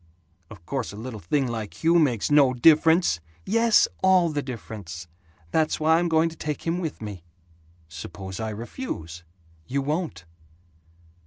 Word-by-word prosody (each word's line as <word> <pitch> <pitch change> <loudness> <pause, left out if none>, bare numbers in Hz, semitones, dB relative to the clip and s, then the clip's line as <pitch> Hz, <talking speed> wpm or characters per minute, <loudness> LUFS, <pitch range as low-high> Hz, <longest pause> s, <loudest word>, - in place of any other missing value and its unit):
"Of 95 -7 -13
course 130 +2 -3
a - - -10
little 110 +1 -7
thing 135 - 0
like 115 0 -6
Hugh 170 +1 +5
makes 130 -6 +1
no 140 -3 +5
difference!" 160 - +5 0.3
"Yes, 230 +2 +4
all 185 -2 +4
the 150 -2 -2
difference. 105 -9 -8 0.4
That's 155 +4 +1
why 160 +1 +4
I'm 175 0 0
going 160 0 +3
to 165 - -12
take 150 -2 -4
him 170 +2 0
with 160 -9 -5
me." 100 -5 -7 0.6
"Suppose 90 +3 -8
I 110 -1 -2
refuse?" 105 - -6 0.4
"You 140 +1 -1
won't!" 150 - -3
135 Hz, 150 wpm, -25 LUFS, 105-160 Hz, 0.6 s, Hugh